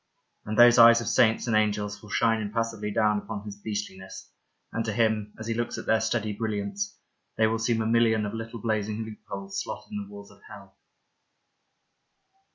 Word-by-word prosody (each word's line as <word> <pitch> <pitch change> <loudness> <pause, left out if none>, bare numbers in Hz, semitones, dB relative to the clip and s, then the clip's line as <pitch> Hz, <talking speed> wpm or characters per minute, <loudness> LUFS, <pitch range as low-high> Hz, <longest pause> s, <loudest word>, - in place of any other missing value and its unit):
And 105 0 -3
those 120 0 +7
eyes 115 0 +9
of 120 - -5
saints 110 -3 +3
and 115 -3 0
angels 105 -1 0
will 105 - -13
shine 115 0 +2
impassively 110 0 -3
down 105 0 +2
upon 105 -1 -7
his 105 -1 -8
beastliness, 100 -3 -6 0.4
and 115 - -1
to 110 - -1
him, 110 -1 0
as 110 - -7
he 115 - -1
looks 120 +1 -3
at - - -6
their 110 0 +2
steady 110 -1 -1
brilliance, 110 - -3 0.4
they 110 - +4
will 110 +1 0
seem 115 0 0
a - - -4
million 110 -1 +3
of 105 - -4
little 115 +1 -6
blazing 110 0 -2
loopholes 195 - -6
slotted 220 - -8
in 210 - -4
the 200 - -14
walls 205 0 -11
of - - -20
hell. - - -13
110 Hz, 185 wpm, -27 LUFS, 105-115 Hz, 0.4 s, eyes